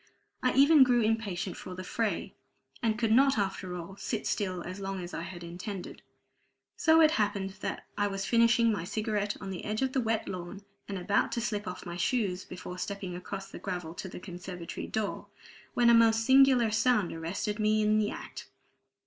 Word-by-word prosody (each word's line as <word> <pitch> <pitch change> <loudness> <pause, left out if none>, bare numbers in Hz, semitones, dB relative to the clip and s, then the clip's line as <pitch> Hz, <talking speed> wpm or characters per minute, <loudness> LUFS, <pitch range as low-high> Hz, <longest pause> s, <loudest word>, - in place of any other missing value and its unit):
I 255 - +2
even 285 +2 +7
grew 245 -2 +3
impatient 210 -5 -1
for 185 - -8
the 185 - -6
fray, 220 +3 -2 0.5
and 220 -2 +1
could 225 -2 +1
not 270 +3 +5
after 195 -3 -2
all 180 +3 -8
sit 220 +1 -3
still 185 -4 -1
as 185 +2 -7
long 195 -1 -4
as 175 0 -7
I - - -3
had 175 0 -7
intended. 180 +3 -7 0.7
So 320 0 +5
it 310 -1 +6
happened 200 -2 -1
that - - -4
I 205 - +3
was 195 -1 -3
finishing 230 0 +4
my 205 -6 -2
cigarette 210 +1 -2
on 195 -1 -6
the 180 - -6
edge 215 +4 -1
of 260 -1 -1
the 265 - +2
wet 225 -1 -1
lawn, 185 +2 -6 0.2
and 200 - -4
about 185 +3 +1
to - - -1
slip 210 -2 -2
off 180 - -6
my 175 -1 -5
shoes 190 -2 0
before 180 0 -8
stepping 195 -2 -4
across 195 +2 -7
the - - -8
gravel 180 -4 -4
to 190 - -6
the - - -8
conservatory 180 -2 -7
door, 215 -2 -3 0.5
when 235 -1 +5
a - - +6
most 225 -1 +5
singular 260 -3 +6
sound 215 -2 +2
arrested 190 +6 -3
me 215 0 +3
in 215 0 +3
the 210 - +1
act. - - -8
205 Hz, 195 wpm, -30 LUFS, 185-225 Hz, 0.7 s, even